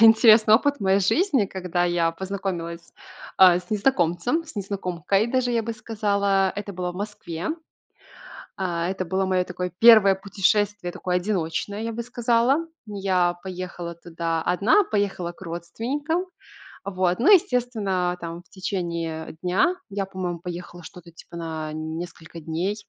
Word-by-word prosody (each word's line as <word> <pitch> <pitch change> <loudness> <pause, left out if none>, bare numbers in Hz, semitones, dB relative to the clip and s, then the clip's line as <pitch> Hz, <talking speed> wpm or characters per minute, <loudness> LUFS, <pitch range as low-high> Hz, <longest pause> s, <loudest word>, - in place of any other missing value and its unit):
интересный 220 -1 +7
опыт 285 +4 +3
в - - -33
моей 195 0 +3
жизни, 270 - +2
когда 180 -2 -2
я 170 -1 +1
познакомилась, 175 -2 -5 0.4
а, 180 -2 +7
с 180 0 -12
незнакомцем, 210 - +1
с 290 - -13
незнакомкой 195 0 -1
даже, 250 0 0
я 230 -1 +1
бы 230 +1 -4
сказала. 200 -3 +1
Это 205 0 -5
было 180 0 -3
в - - -16
Москве. 195 - -4 1.0
А, 175 -3 -1
это 190 0 -2
было 190 +2 0
моё 185 -1 +1
такое 180 -1 -5
1 215 -4 +8
путешествие, 200 -1 0
такое 180 0 -2
одиночное, 190 +2 -2
я 230 - -3
бы 235 +1 -4
сказала. 245 +6 +1 0.2
Я 190 -4 +1
поехала 180 -2 -6
туда 165 -1 -3
одна, 205 - +3
поехала 200 - -1
к 180 - -18
родственникам. 240 - -3 0.6
Вот, 185 -2 0
ну, 340 - +5
естественно, 225 - +2
а, - - -9
там, 170 0 -7
в - - -32
течение 170 -5 -4
дня 190 - +2
я, 195 0 -2
по-моему, 185 -3 -4
поехала 175 0 -8
что-то 170 +1 -12
типа 165 - -14
на 160 -2 -5
несколько 160 +1 -7
дней. 165 +6 -2
190 Hz, 145 wpm, -24 LUFS, 175-215 Hz, 1.0 s, 1